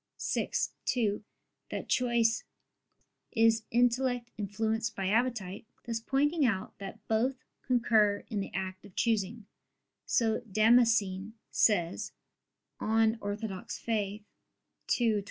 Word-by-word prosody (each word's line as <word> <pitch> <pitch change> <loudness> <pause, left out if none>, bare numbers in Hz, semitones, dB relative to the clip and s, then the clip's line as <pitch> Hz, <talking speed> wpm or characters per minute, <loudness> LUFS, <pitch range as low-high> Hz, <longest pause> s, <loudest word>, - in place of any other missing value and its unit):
vi, - - 0 0.4
2) 215 -4 0 0.5
that - - -4
choice 235 -2 +2 0.9
"is 225 -1 +4
intellect 245 0 +1
influenced 220 +2 -2
by 190 -1 -2
appetite," 220 -3 0 0.2
thus 230 -1 -2
pointing 290 +6 +1
out 215 -7 0
that 200 +2 -9
both 250 +4 0 0.2
concur 220 -5 +3
in 215 -4 -2
the 195 - -3
act 185 -1 -4
of 200 -2 -15
choosing; 220 -1 0 0.6
so 225 -2 +2
Damascene 220 -2 +3 0.2
says 175 -6 +2 0.7
(De - - -6 0.3
Fide - - -12
Orth. 205 0 -3
225 Hz, 100 wpm, -30 LUFS, 205-240 Hz, 0.9 s, is